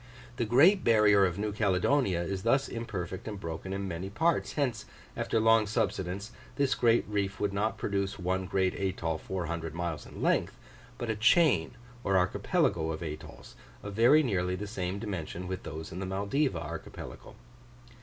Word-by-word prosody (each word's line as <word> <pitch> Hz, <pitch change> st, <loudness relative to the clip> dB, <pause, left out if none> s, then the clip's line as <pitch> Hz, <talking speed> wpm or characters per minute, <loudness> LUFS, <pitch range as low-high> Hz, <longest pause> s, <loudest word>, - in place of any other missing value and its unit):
The 120 Hz, -, 0 dB
great 155 Hz, -, +5 dB
barrier 105 Hz, -3 st, +5 dB
of 90 Hz, 0 st, -4 dB
New 105 Hz, +1 st, -1 dB
Caledonia 100 Hz, -1 st, +1 dB
is 95 Hz, +2 st, -3 dB
thus 135 Hz, +6 st, +2 dB
imperfect 100 Hz, -6 st, -5 dB
and 105 Hz, -2 st, -5 dB
broken 85 Hz, +2 st, -5 dB
in 100 Hz, 0 st, -3 dB
many 90 Hz, +2 st, -4 dB
parts; 165 Hz, +11 st, +1 dB
hence, 125 Hz, -7 st, -1 dB, 0.3 s
after 115 Hz, -, 0 dB
long 115 Hz, -1 st, +4 dB
subsidence, 100 Hz, -1 st, -2 dB, 0.2 s
this 140 Hz, -2 st, +2 dB
great 115 Hz, -1 st, +3 dB
reef 100 Hz, -2 st, -2 dB
would 100 Hz, -1 st, 0 dB
not 105 Hz, +3 st, 0 dB
produce 100 Hz, 0 st, -2 dB
one 95 Hz, +1 st, -1 dB
great 95 Hz, -1 st, +1 dB
atoll 85 Hz, -4 st, -2 dB
400 85 Hz, -3 st, -4 dB
miles 85 Hz, -3 st, -3 dB
in -, -, -11 dB
length, -, -, +1 dB, 0.4 s
but 120 Hz, -2 st, -2 dB
a -, -, -2 dB
chain 115 Hz, -, +4 dB, 0.3 s
or 95 Hz, -1 st, +2 dB
archipelago 85 Hz, -2 st, +1 dB
of 80 Hz, +1 st, -5 dB
atolls, 75 Hz, -5 st, -8 dB, 0.3 s
of 100 Hz, -, -6 dB
very 120 Hz, +9 st, +6 dB
nearly 90 Hz, -7 st, 0 dB
the 100 Hz, +3 st, -5 dB
same 95 Hz, -2 st, -3 dB
dimension 90 Hz, -4 st, -5 dB
with 95 Hz, 0 st, -4 dB
those 80 Hz, +2 st, -7 dB
in 90 Hz, -, -6 dB
the 95 Hz, -, -3 dB
Maldiva 100 Hz, -, 0 dB
archipelago. 85 Hz, +6 st, -8 dB
100 Hz, 165 wpm, -30 LUFS, 90-110 Hz, 0.4 s, very